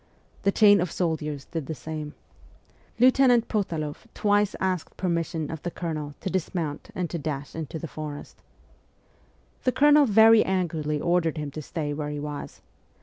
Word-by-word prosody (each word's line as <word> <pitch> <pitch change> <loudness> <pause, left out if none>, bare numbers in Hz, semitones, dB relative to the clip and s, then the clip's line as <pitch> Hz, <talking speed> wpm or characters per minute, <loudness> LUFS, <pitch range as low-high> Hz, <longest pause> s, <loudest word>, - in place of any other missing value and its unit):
The 200 - +2
chain 205 -2 +6
of 180 - -2
soldiers 150 -5 -2
did 160 -5 -5
the 160 - -4
same. 155 +1 -6 0.8
Lieutenant 250 -1 +5
Potaloff 165 -5 -3
twice 205 -1 +2
asked 185 -3 -2
permission 170 -3 -2
of 160 -2 -6
the 175 - -3
Colonel 155 -4 -5
to - - -2
dismount 165 -4 -3
and 180 -1 -1
to 170 - -3
dash 145 -2 -4
into 160 -1 -5
the 165 - -6
forest. 150 -1 -8 1.2
The 255 - +3
Colonel 295 +1 +5
very 220 +1 +7
angrily 160 -5 -1
ordered 170 -1 +1
him 150 -2 -4
to 155 - -6
stay 150 0 -4
where 145 0 -3
he 150 0 -4
was. 150 0 -6
165 Hz, 155 wpm, -26 LUFS, 150-190 Hz, 1.2 s, very